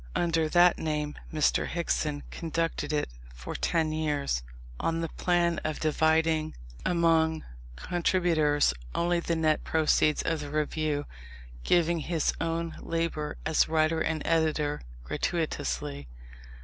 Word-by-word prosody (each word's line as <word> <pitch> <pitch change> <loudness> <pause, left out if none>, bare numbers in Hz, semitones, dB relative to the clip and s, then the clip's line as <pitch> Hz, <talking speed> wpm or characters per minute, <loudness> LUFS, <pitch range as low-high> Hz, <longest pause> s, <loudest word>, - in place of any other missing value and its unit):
Under 165 -2 +1
that 175 +1 +5
name 150 -2 -2 0.2
Mr. 155 -2 +2
Hickson 155 -4 -1
conducted 165 -2 -2
it 150 -1 0 0.3
for - - -7
ten 160 -2 0
years, 150 - -1 0.4
on 165 0 0
the 165 - -2
plan 175 0 +1
of 155 -1 -2
dividing 160 0 +2 0.3
among 165 -2 +2 0.3
contributors 160 - +2 0.2
only 175 0 +2
the 170 0 -1
net 155 -1 +1
proceeds 155 -1 +2
of 165 -1 0
the 145 -1 -6
Review 150 0 -1 0.6
giving 170 - +3
his 160 0 0
own 165 0 -2
labour 165 -3 -2
as 160 -1 +3
writer 160 0 +2
and 160 -2 -1
editor 155 -3 +1 0.2
gratuitously. 70 - -2
160 Hz, 120 wpm, -28 LUFS, 150-165 Hz, 0.6 s, that